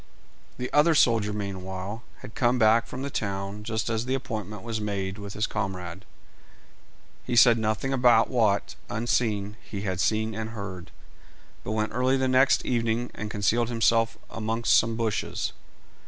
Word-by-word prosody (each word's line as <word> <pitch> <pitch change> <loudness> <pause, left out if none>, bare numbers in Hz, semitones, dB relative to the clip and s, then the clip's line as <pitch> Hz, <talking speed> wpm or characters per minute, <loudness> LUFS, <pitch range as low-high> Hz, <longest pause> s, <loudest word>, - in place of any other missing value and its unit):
The 125 +1 -5
other 155 +2 +5
soldier 115 -6 +3
meanwhile 95 +1 -5 0.2
had 125 -4 -10
come 120 +1 +2
back 115 0 +4
from 130 - -6
the 140 - -4
town 100 -1 -3
just 110 0 -2
as 115 0 -1
the 130 - +1
appointment 110 -6 -5
was 115 -2 -3
made 100 -1 -3
with 100 -1 -7
his 105 - +1
comrade. 95 -2 -4 1.2
He 120 - -2
said 115 0 +7
nothing 110 +5 -1
about 120 -3 +5
what, 110 -6 +1 0.2
unseen, 105 -2 -1
he 100 - -7
had 95 -3 -2
seen 110 +3 +1
and 110 +1 -4
heard, 95 -4 -7 0.7
but 110 - -3
went 110 0 -1
early 130 +3 +2
the 130 0 +1
next 130 +1 +4
evening 115 0 0
and 105 - -5
concealed 115 +3 +1
himself 115 -1 +2
amongst 115 +1 +1
some 115 0 +3
bushes. 110 -2 -2
110 Hz, 155 wpm, -26 LUFS, 100-120 Hz, 1.2 s, said